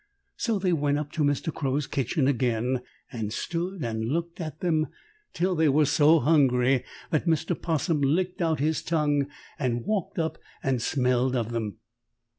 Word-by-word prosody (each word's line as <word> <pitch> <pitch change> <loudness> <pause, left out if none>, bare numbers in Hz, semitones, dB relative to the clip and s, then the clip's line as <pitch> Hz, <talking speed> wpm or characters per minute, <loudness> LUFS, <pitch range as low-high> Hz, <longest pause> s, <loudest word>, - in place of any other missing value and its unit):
So 225 -3 0
they 185 -2 +1
went 145 -2 +1
up 150 -1 -4
to 160 - -2
Mr. 145 +2 0
Crow's 140 +1 -1
kitchen 135 +1 0
again 125 -1 +1 0.3
and 110 -3 -4
stood 175 - -3
and 110 -1 -2
looked 170 +8 -2
at 155 -3 -6
them 160 -4 +1 0.4
till 185 +1 0
they 160 -3 +3
were 150 +2 +4
so 150 +2 +5
hungry 135 -4 +3 0.3
that 155 +2 +1
Mr. 160 +2 +1
'Possum 160 -1 0
licked 180 +7 +1
out 160 -3 +1
his 155 +2 +1
tongue 145 -4 +1 0.3
and 120 -4 -1
walked 210 -5 -2
up 160 -1 -1 0.2
and 130 -3 +1
smelled 125 0 +1
of 120 -2 -1
them. 110 -3 -3
145 Hz, 165 wpm, -27 LUFS, 130-165 Hz, 0.4 s, so